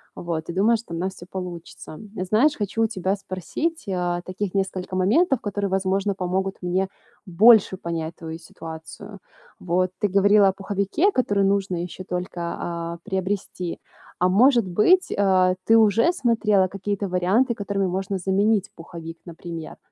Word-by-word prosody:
Вот, 165 -2 -4
и 170 - -4
думаю, 220 +5 +3
что 215 -6 -10
у - - -3
нас 190 +2 -2
всё 175 - -11
получится. 175 -4 -8 0.2
Знаешь, 220 +11 +3
хочу 210 +2 -1
у 225 - +3
тебя 190 -2 -1
спросить, 200 - -4
а, 175 -1 -1
таких 185 +1 -4
несколько 190 -1 -2
моментов, 265 - +2
которые, 205 -1 -2
возможно, 195 +1 0
помогут 190 +1 -2
мне 185 +2 0 0.4
больше 200 +1 +5
понять 165 -2 -4
твою 160 -1 -7
ситуацию. 160 -1 -10 0.4
Вот, 185 +1 0
ты 205 - +2
говорила 200 +1 +5
о - - -1
пуховике, 200 - 0
который 205 - +1
нужно 195 -2 +1
еще 180 +1 -7
только, 180 -1 -4 0.2
а, 170 0 -4
приобрести. 190 -3 -3 0.4
А 180 +1 +3
может 235 +1 +4
быть, 280 - +3
а, 185 -2 +3
ты 225 - +6
уже 225 - +4
смотрела 225 - +2
какие-то 200 +1 -3
варианты, 190 +8 +1
которыми 200 -2 -1
можно 190 +2 -2
заменить 200 +2 +1
пуховик, 165 0 -9
например? 165 -2 -8
190 Hz, 150 wpm, -23 LUFS, 180-205 Hz, 0.4 s, ты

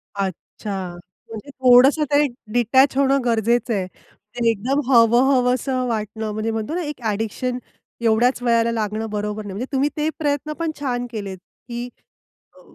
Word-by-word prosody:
अच्छा. 190 -1 -5 0.3
म्हणजे 225 +5 -8
थोडंसं 260 +3 +5
ते 290 +1 +4 0.3
डिटॅच 260 +3 +4
होणं 275 0 +3
गरजेचं 235 0 +1
आहे. 190 -3 -1
ते 230 +5 -5
एकदम 235 +6 0
हवहवसं 255 +1 +3
वाटणं 220 -1 -3
म्हणजे 215 +1 -2
म्हणतो 225 +7 -3
ना, 360 - -1
एक 295 -4 -6
ॲडिक्शन 225 +4 -2 0.4
एवढ्याच 235 +2 +2
वयाला 230 -1 +3
लागणं 220 0 -2
बरोबर 210 0 -3
नाही. 200 - -6
म्हणजे 245 - -3
तुम्ही 275 +1 +1
ते 305 +1 +1
प्रयत्न 295 0 -1
पण 330 -1 -1
छान 245 -4 -2
केलेत, 200 -4 -5 0.3
की 240 0 -5 0.7
अ, - - -17
235 Hz, 145 wpm, -21 LUFS, 215-265 Hz, 0.7 s, थोडंसं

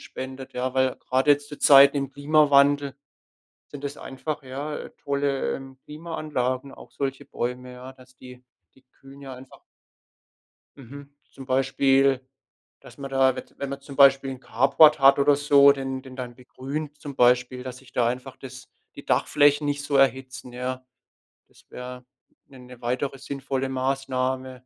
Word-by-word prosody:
spendet, 130 0 -9
ja, 125 +1 -3
weil 130 -1 +1
grad 130 +2 -1
jetzt 145 0 +3
zu 145 - -10
Zeiten 140 0 +7
im 135 -1 -2
Klimawandel 145 -1 +3 0.7
sind 145 -1 -11
das 140 0 -5
einfach, 145 +3 -6
ja, 140 +3 -6
äh, - - -9
tolle, 140 -1 -2
ähm, 135 -1 -11
Klimaanlagen, 150 -5 -4
auch - - -15
solche 135 0 -4
Bäume, 125 -1 -5
ja? 125 +1 -11
Dass 130 0 -20
die 125 0 -14 0.3
die 130 - -24 0.2
kühlen 135 +1 -15
ja 135 -1 -8
einfach 130 +1 -14 1.2
Mhm. 140 +2 -12 0.2
Zum 135 - -12
Beispiel, 135 0 +2 0.6
dass - - -16
man 135 -1 -7
da, 135 -1 +3
wez - - -10
wenn 140 - -4
man 140 0 -6
zum 140 0 -12
Beispiel 135 -1 +5
'n 130 -1 -8
Carport 155 +1 +4
hat 135 0 +6
oder 140 0 +4
so, 140 -1 +6
den 135 -1 -5
den 130 -1 -12
dann 125 -2 -7
begrünt 140 +4 -7
zum 145 -1 -8
Beispiel, 125 +1 +2
dass 130 -1 -8
sich 130 -1 -19
da 120 -2 +1
einfach, 125 +2 -4
das 130 -1 -11 0.3
die - - -10
Dachflächen 145 0 +2
nicht 145 0 -2
so 140 -1 0
erhitzen, 130 -1 0
ja. 130 +1 -5 0.6
Das - - -24
wäre 125 0 -9 0.4
'ne 135 -2 -16
ne 125 -1 -14
weitere 130 +3 -3
sinnvolle 135 -1 -4
Maßnahme. 130 0 -2
135 Hz, 165 wpm, -24 LUFS, 130-140 Hz, 1.2 s, Zeiten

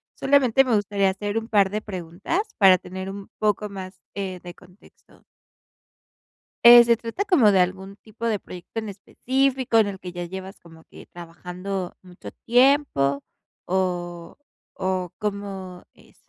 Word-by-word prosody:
Solamente 270 -2 +3
me 240 - +2
gustaría 200 -1 +1
hacer 205 +3 -3
un 225 - -3
par 200 -4 +3
de 210 +2 -2
preguntas 185 - -3 0.2
para 190 -3 +7
tener 190 +2 -7
un 200 0 -9
poco 210 0 0
más, 185 -1 -9
eh, 190 -2 -5
de 175 -1 -9
contexto. 180 +4 -22 1.4
Eh, 240 0 +11
¿se 235 0 +3
trata 230 - -4
como 280 - +4
de 190 - +4
algún 190 +2 -2
tipo 220 +2 -8
de 215 -3 0
proyecto 180 +5 -8
en 220 - -7
específico, 260 +4 0
en 220 - +4
el 195 -2 -6
que 180 - -7
ya 175 0 -5
llevas 190 +3 -8
como 165 -1 -17
que, - - -15
trabajando 180 +2 -7
mucho 180 0 -12 0.2
tiempo 245 - +3 0.4
o 175 -2 -3 0.4
o 185 -2 -1
cómo 195 -3 -5
es? - - -22
195 Hz, 150 wpm, -23 LUFS, 180-225 Hz, 1.4 s, Eh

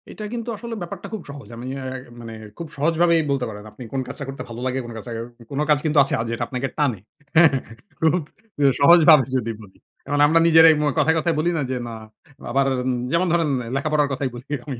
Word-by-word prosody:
এটা 215 - -8
কিন্তু 235 0 -4
আসলে 235 +2 -7
ব্যাপারটা 175 +2 -7
খুব 210 -5 -5
সহজ। 140 -1 -9
আমি 120 +2 -7
অ্যা 135 - -6 0.3
মানে 115 -1 -8 0.2
খুব 170 - -6
সহজভাবেই 165 +3 +3
বলতে 135 -3 0
পারেন। 105 -1 -9
আপনি 125 - -11
কোন 135 - 0
কাজটা 140 +2 -7
করতে 135 -1 -7
ভালো 115 +1 -7
লাগে, 130 +1 -1
কোন 120 - -8
কাছাও 115 +2 -7 0.4
কোন 140 - -3
কাজ 150 - +5
কিন্তু 155 -1 +1
আছে 135 - -4
আ - - +1
যেটা 115 - -2
আপনাকে 130 +1 -3
টানে। 135 -9 +1 0.4
হ্যাঁ, 160 -1 +7 0.5
খুব 160 -1 +3 0.5
যে 145 - +3
সহজভাবে 155 -2 +7
যদি 115 -2 -2
বলি 100 -3 -16 0.3
এখন 145 0 0
আমরা 165 +2 +4
নিজেরাই 160 -1 +8
মু 150 - 0
কথায়, 160 - +3
কথায়, 165 0 0
বলি 170 +3 +1
না - - 0
যে, - - -1
"না!' 115 - -6 0.6
আবার 135 +2 +2 0.2
উম 130 - 0 0.2
যেমন 170 +2 +2
ধরেন 165 -3 +2 0.3
লেখাপড়ার 150 +1 +1
কথাই 135 0 -2
বলি 125 +4 -11 0.2
আমি 135 -4 -4
145 Hz, 215 wpm, -22 LUFS, 130-165 Hz, 0.6 s, নিজেরাই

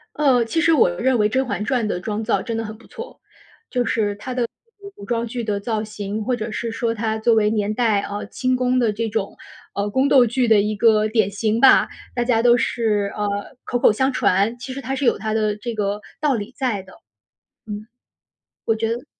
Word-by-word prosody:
呃， 265 -5 +3
其 325 +9 0
实 330 0 +4
我 270 - +5
认 240 +9 +1
为 210 0 +3
《甄 265 +1 +1
嬛 210 -3 -3
传》 250 0 0
的 180 - -2
妆 215 +3 -3
造 200 -2 +1
真 230 +2 -4
的 225 - -2
很 215 0 -8
不 - - -19
错， 465 - -10 0.5
就 245 -1 0
是 210 -3 0
它 250 +5 -6
的 245 -2 0 0.3
古 400 0 -10
古 200 - -12
装 235 +1 -1
剧 235 +1 -4
的 210 -2 -1
造 215 +1 -2
型， 210 0 -5
或 250 +3 0
者 220 -1 -5
是 230 +1 -3
说 230 0 -1
它 220 0 -2
作 225 +1 +3
为 210 -1 +3
年 210 -1 0
代 220 -3 +2
呃， 205 +1 -5
清 255 +2 -1
宫 255 0 +1
的 235 -3 +2
这 225 +2 -3
种， 205 -2 -3 0.4
呃， 200 +1 -1
宫 260 +6 +2
斗 260 -3 +6
剧 240 +2 0
的 220 -2 +5
一 210 +1 -1
个 215 -1 +4
典 215 -2 +1
型 215 +2 -1
吧， 270 - +6 0.3
大 240 - +1
家 235 -2 +2
都 240 0 +5
是， 210 -4 0
呃， 205 +3 -3
口 245 - -1
口 240 - +5
相 265 +6 +1
传， 210 -1 +1
其 260 +2 -7
实 275 - -6
它 265 +2 -3
是 275 +1 -2
有 - - +3
它 220 -1 -3
的 215 -1 +1
这 235 +3 -5
个 205 0 -2 0.2
道 300 -3 +2
理 210 +1 -5
在 245 -8 -1
的。 190 - -16 0.7
嗯。 210 0 -6 0.8
我 225 - +1
觉 225 0 -1
得 235 +2 -3
225 Hz, 245 characters per minute, -21 LUFS, 210-245 Hz, 0.8 s, 斗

